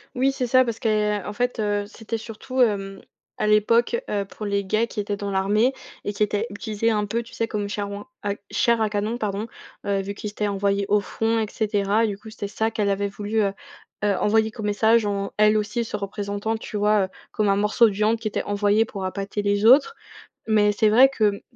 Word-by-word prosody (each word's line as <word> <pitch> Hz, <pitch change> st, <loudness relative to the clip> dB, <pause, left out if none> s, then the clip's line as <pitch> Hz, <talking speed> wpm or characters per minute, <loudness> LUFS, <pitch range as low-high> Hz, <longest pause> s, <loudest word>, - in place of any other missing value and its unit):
Oui, 265 Hz, +2 st, +2 dB
c'est 255 Hz, -2 st, -2 dB
ça, 255 Hz, +1 st, +5 dB
parce 230 Hz, -2 st, -4 dB
que 210 Hz, -2 st, +1 dB
en 210 Hz, -, -5 dB
fait, 245 Hz, +1 st, -1 dB
heu, 205 Hz, -1 st, 0 dB
c'était 225 Hz, +1 st, -6 dB
surtout, 230 Hz, +4 st, -4 dB
hem, 195 Hz, -4 st, +1 dB, 0.4 s
à -, -, -1 dB
l'époque, 220 Hz, -, +3 dB
heu, 200 Hz, -1 st, -1 dB
pour 210 Hz, +2 st, -7 dB
les 200 Hz, 0 st, -1 dB
gays 215 Hz, +4 st, +1 dB
qui 215 Hz, -, -6 dB
étaient 205 Hz, 0 st, -2 dB
dans 200 Hz, 0 st, -5 dB
l'armée 205 Hz, +6 st, +2 dB, 0.3 s
et 205 Hz, -, -3 dB
qui 210 Hz, -, +1 dB
étaient 210 Hz, +2 st, -1 dB
utilisés 210 Hz, +2 st, -2 dB
un 210 Hz, -2 st, +1 dB
peu, 230 Hz, +3 st, -1 dB
tu 230 Hz, -, -14 dB
sais, 230 Hz, -, -1 dB
comme 205 Hz, -2 st, -3 dB
chair 205 Hz, 0 st, -3 dB
ouin 205 Hz, +3 st, -7 dB, 0.2 s
à 200 Hz, -, 0 dB, 0.2 s
chair 235 Hz, -2 st, +2 dB
à 215 Hz, -, +2 dB
canon 210 Hz, +3 st, -2 dB
pardon, 210 Hz, 0 st, -2 dB, 0.4 s
heu, 200 Hz, -1 st, 0 dB
vu 200 Hz, +1 st, -6 dB
qu'ils 210 Hz, 0 st, -6 dB
étaient 210 Hz, 0 st, -2 dB
envoyés 200 Hz, 0 st, 0 dB
au 210 Hz, 0 st, +4 dB
front 225 Hz, +3 st, -1 dB
et 220 Hz, -, +1 dB
cetera. 210 Hz, +1 st, +1 dB
Du 200 Hz, -2 st, -4 dB
coup, 220 Hz, +1 st, -12 dB
c'était 205 Hz, -2 st, -5 dB
ça 220 Hz, +2 st, -1 dB
qu'elle 210 Hz, -2 st, 0 dB
avait 200 Hz, +1 st, 0 dB
voulu, 205 Hz, +2 st, -3 dB
heu 195 Hz, -1 st, 0 dB, 0.5 s
heu, 205 Hz, -1 st, +2 dB
envoyer 220 Hz, +1 st, +2 dB
comme 215 Hz, -1 st, -7 dB
message 220 Hz, +2 st, +3 dB
en, 200 Hz, -1 st, -2 dB
elle 215 Hz, 0 st, +5 dB
aussi, 210 Hz, +3 st, -1 dB
se 210 Hz, -, -5 dB
représentant 205 Hz, +2 st, -3 dB
tu 220 Hz, -, -9 dB
vois, 210 Hz, 0 st, +3 dB
heu, -, -, -11 dB, 0.2 s
comme 215 Hz, -3 st, +1 dB
un 195 Hz, -, +4 dB
morceau 210 Hz, +3 st, +4 dB
de 210 Hz, -, -2 dB
viande 215 Hz, +3 st, +2 dB
qui 220 Hz, -, -3 dB
était -, -, -2 dB
envoyé 205 Hz, +2 st, +2 dB
pour 200 Hz, -3 st, -7 dB
appâter 200 Hz, +2 st, -3 dB
les 205 Hz, +1 st, +1 dB
autres, 285 Hz, -, +6 dB, 0.6 s
mais 210 Hz, -1 st, +4 dB
c'est 215 Hz, +1 st, +3 dB
vrai 250 Hz, +5 st, +7 dB
que 215 Hz, -6 st, 0 dB
210 Hz, 230 wpm, -23 LUFS, 200-225 Hz, 0.6 s, vrai